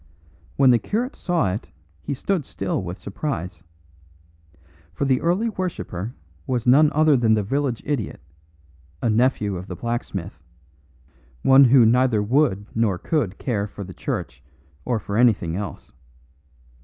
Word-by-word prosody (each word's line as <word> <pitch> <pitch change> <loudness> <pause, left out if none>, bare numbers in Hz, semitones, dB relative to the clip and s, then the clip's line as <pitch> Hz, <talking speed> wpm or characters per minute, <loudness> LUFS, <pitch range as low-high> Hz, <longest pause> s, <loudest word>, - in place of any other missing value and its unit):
When 135 -2 +5
the 120 - +4
curate 235 - -2
saw 170 - 0
it 105 - -6 0.3
he 140 - -4
stood 180 +4 -1
still 95 -6 -3
with 90 0 -6
surprise. 90 - -5 1.3
For 140 - -1
the 130 -2 +2
early 180 +7 +1
worshipper 160 - -4 0.3
was 125 -3 -1
none 145 +5 +5
other 155 -1 +4
than 115 -3 +3
the 105 - 0
village 135 +2 -1
idiot, 140 -8 -3 0.8
a 115 - +2
nephew 110 -4 +1
of 90 +2 -8
the 90 - -6
blacksmith, 95 -6 -4 1.0
one 135 +1 +7
who 125 -1 +6
neither 120 -2 +3
would 115 -4 +1
nor 110 -5 +1
could 110 - -1
care 105 -6 -2
for 100 0 -8
the 95 -1 -9
church 65 -5 -5 0.4
or 125 -2 0
for 100 0 -4
anything 110 -9 +3
else. 100 0 -6
120 Hz, 145 wpm, -23 LUFS, 100-140 Hz, 1.3 s, one